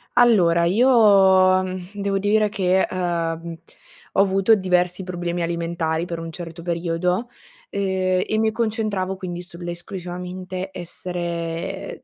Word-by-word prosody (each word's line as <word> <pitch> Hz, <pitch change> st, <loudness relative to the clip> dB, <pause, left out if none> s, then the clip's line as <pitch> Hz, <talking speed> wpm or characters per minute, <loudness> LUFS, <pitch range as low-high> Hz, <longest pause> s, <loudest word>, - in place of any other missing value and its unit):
Allora 185 Hz, -9 st, +5 dB
io, 195 Hz, -4 st, +5 dB, 0.3 s
devo 200 Hz, -1 st, -1 dB
dire 210 Hz, +2 st, +2 dB
che, 190 Hz, -2 st, +2 dB
ehm, 170 Hz, -2 st, -2 dB, 0.6 s
ho -, -, +4 dB
avuto 195 Hz, +2 st, +4 dB
diversi 180 Hz, -1 st, 0 dB
problemi 175 Hz, -1 st, -3 dB
alimentari 170 Hz, -1 st, -1 dB
per 170 Hz, -1 st, -5 dB
un 165 Hz, 0 st, -6 dB
certo 170 Hz, -1 st, -8 dB
periodo, 175 Hz, +5 st, -1 dB, 0.4 s
ehm, 185 Hz, -2 st, 0 dB
e 215 Hz, -, 0 dB
mi 220 Hz, 0 st, +2 dB
concentravo 215 Hz, -4 st, -1 dB
quindi 175 Hz, -2 st, -6 dB
sull'esclusivamente 180 Hz, +1 st, -6 dB
essere, 180 Hz, 0 st, -5 dB
ehm, 170 Hz, +2 st, -4 dB
185 Hz, 115 wpm, -22 LUFS, 170-195 Hz, 0.6 s, Allora